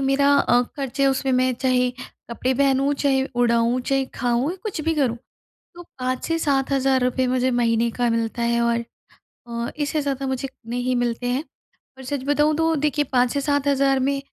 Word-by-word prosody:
मेरा 280 +1 +3
अ, 245 -2 +3
खर्च 270 0 -4
है 275 - +5
उसमें 270 0 +1
मैं 255 0 +2
चाहे 250 0 +1 0.4
कपड़े 255 +2 -1
पहनूँ, 275 +1 +2
चाहे 270 -1 +1
उड़ाऊँ, 235 0 +2
चाहे 270 +1 0
खाऊँ 245 +3 0
या 370 - -5
कुछ 415 -8 -4
भी 325 +1 0
करूँ। 260 -6 +1 0.6
तो 350 - -9
5 255 -5 -4
से 330 0 0
7 275 -3 0
हजार 270 -1 +2
रुपए 255 +1 +1
मुझे 255 0 +1
महीने 235 -1 +1
का 245 +1 -1
मिलता 230 +1 -1
है 235 0 +1
और 235 0 +1 0.7
अ, 235 0 -3
इससे 295 +1 0
ज़्यादा 275 -1 -2
मुझे 265 +1 -2 0.2
नहीं 245 +1 -1
मिलते 245 0 -1
हैं। 255 +5 -1 0.6
और 265 - -10
सच 270 0 -3
बताऊँ 295 +2 +2
तो 325 0 +2
देखिए 295 0 0
5 245 -1 +3
से 285 - -1
7 285 0 0
हजार 275 -1 +2
में 275 +1 0
265 Hz, 195 wpm, -22 LUFS, 245-280 Hz, 0.7 s, है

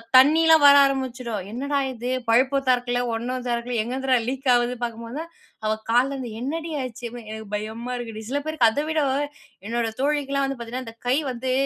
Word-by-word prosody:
தண்ணிலாம் 315 +4 +7
வர 285 0 +9
ஆரம்பிச்சுடும். 255 -6 -2
என்னடா 280 +5 -2 0.2
இது 245 +1 -5 0.2
பைப்பு 260 +4 +4
திறக்கல, 245 -1 +2
ஒண்ணும் 250 +2 -3
திறக்கல, 240 0 -2
எங்கேருந்துடா 260 +2 +1
லீக் 265 +1 -2
ஆகுது 240 0 +2
பாக்கும்போது 230 +2 -5
தான், 335 +1 -7 0.3
அவ 215 - +2 0.2
"கால்ல 245 +4 +3
இருந்து 255 -4 -5
என்னடி 320 +5 -3
ஆச்சு?" 250 -1 -7
அப்டினா 240 0 -9
"எனக்கு 220 0 -7
பயமா 220 +4 -4
இருக்குடி." 225 -3 -6
சில 285 +2 0
பேருக்கு 310 -7 +3
அத 285 +7 -1
விட 315 -1 +1 0.7
என்னோட 235 0 0
தோழிக்கலாம் 280 -1 +1
வந்து 270 -1 -4
பாத்தீங்கன்னா 240 +2 -5
இந்த 225 - -9
கை 255 +2 +3
வந்து, 255 +1 -3
250 Hz, 175 wpm, -24 LUFS, 235-275 Hz, 0.7 s, வர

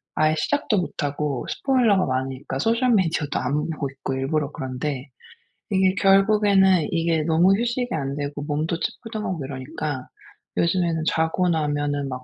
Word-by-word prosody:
아예 155 0 +3
시작도 285 - 0
못하고 145 -5 -2
스포일러가 235 -8 +2
많으니까 130 +1 -3
소셜 230 - +2
미디어도 165 -7 +1
안 150 +3 -1
보고 145 -3 -3
있고 135 0 -5
일부러 140 +2 -1
그런데, 130 0 -4 0.6
이게 190 -1 +3
결국에는 195 -2 +4
이게 165 -1 +1
너무 170 +5 +4
휴식이 240 +1 -1
안되고 145 0 -3
몸도 155 +3 -2
찌뿌둥하고 215 - -4
이러니까 130 +1 -5 0.5
요즘에는 170 -2 +1
자고 160 +3 +1
나면은 145 -3 0
막 130 0 -6
160 Hz, 350 characters per minute, -23 LUFS, 145-190 Hz, 0.6 s, 결국에는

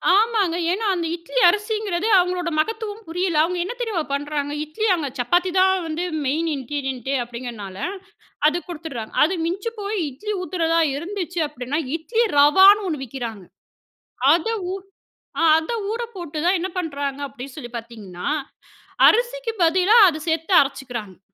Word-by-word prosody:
ஆமாங்க. 420 -5 +2 0.2
ஏனா, 430 +4 -1
அந்த 335 -2 -2
இட்லி 350 +9 -2
அரிசிங்கிறது 420 -1 -1
அவங்களோட 360 -1 0
மகத்துவம் 440 +3 -2
புரியல. 350 0 -1
அவங்க 360 +2 -1
என்ன 425 - -4
தெரியுமா 415 -9 -1
பண்றாங்க, 290 0 -2
இட்லி 310 +9 -2
அங்க 305 -4 -3
சப்பாத்தி 350 +9 +2
தான் 380 0 +5
வந்து 320 +3 -3 0.2
மெயின் 320 +5 0
இன்கிரீடியன்ட்டே 270 -1 -3
அப்டிங்கிறதுனால 235 -5 -7 0.7
அது 310 +3 +2
குடுத்துடுறாங்க. 300 -10 -7
அது 335 - +2
மிஞ்சி 380 +6 -2
போய் 410 +1 -3
இட்லி 420 +12 -5
ஊத்துறதா 335 -2 0 0.2
இருந்துச்சு 355 +2 -4
அப்டின்னா, 285 +1 -3 0.2
இட்லி 460 +9 0
ரவான்னு 385 +8 +7
ஒண்ணு 300 -5 -3
விக்கிறாங்க. 230 -6 -6 0.9
அத 345 +6 0 0.2
ஊ - - -4 0.8
ஆ - - +3
அத 320 +8 -2 0.2
ஊறப்போட்டு 395 -10 -5
தான் 370 +2 +4
என்ன 370 - -3
பண்றாங்க 285 -5 -3
அப்டி 265 -1 -9
சொல்லி 245 -6 -8
பார்த்தீங்கன்னா, 215 -6 -8 0.8
அரிசிக்கு 485 +1 +2
பதிலா 370 +7 +4
அத 310 -1 -5
சேர்த்து 325 +4 0
அரைச்சுக்குறாங்க. 245 -8 -5
330 Hz, 140 wpm, -22 LUFS, 275-390 Hz, 0.9 s, ரவான்னு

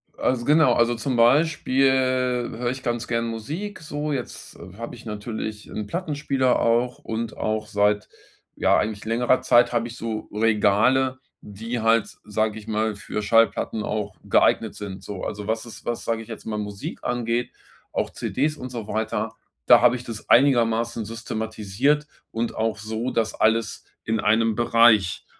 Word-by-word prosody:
Also, 120 -2 0
genau, 150 -4 +5
also 120 0 +2
zum 125 +3 -2
Beispiel 135 +1 +3
höre 125 -2 0
ich 130 - -6
ganz 120 -1 -2
gern 115 -1 -1
Musik, 155 - -5
so, 150 -1 -4
jetzt 130 -4 -6 0.2
habe 115 +1 -6
ich 115 - -14
natürlich 110 0 -5
'n 105 - -4
Plattenspieler 140 - 0
auch 120 +2 +1
und 115 0 -5
auch 110 0 -2
seit, 105 0 +1 0.5
ja, - - +3
eigentlich 105 0 -2
längerer 120 +3 +2
Zeit 120 +1 +4
habe 120 0 0
ich 115 - -9
so 110 -2 -4
Regale, 115 +5 +2 0.2
die 110 +3 -5
halt, 115 0 +3
s - - -15
sage 110 +1 -1
ich 110 0 -11
mal, 110 -1 0
für 105 +1 -5
Schallplatten 115 0 +2
auch 105 -2 -3
geeignet - - +2
sind, 100 -2 -8
so. 100 -3 -7
Also 105 -1 -4
was 110 +2 -2
ist - - -11
was, 120 - -3
sage 115 -1 -2
ich - - -17
jetzt, 115 - -8
mal 105 -1 -3
Musik 105 -1 -6
angeht, 120 0 -1 0.4
auch - - -1
CDs 150 +3 -2
und 130 - -7
so 115 -4 -6
weiter, 110 +1 -2 0.3
da - - +8
habe 125 0 +5
ich 125 - -6
das 115 -3 -8
einigermaßen 115 -3 +3
systematisiert 110 +5 -1 0.2
und 115 +1 -2
auch 110 -1 -1
so, 110 +3 -3
dass 110 -1 -1
alles 110 0 +1 0.2
in 110 -1 -1
1 110 +1 +2
Bereich 115 -5 +4
115 Hz, 165 wpm, -24 LUFS, 110-125 Hz, 0.5 s, da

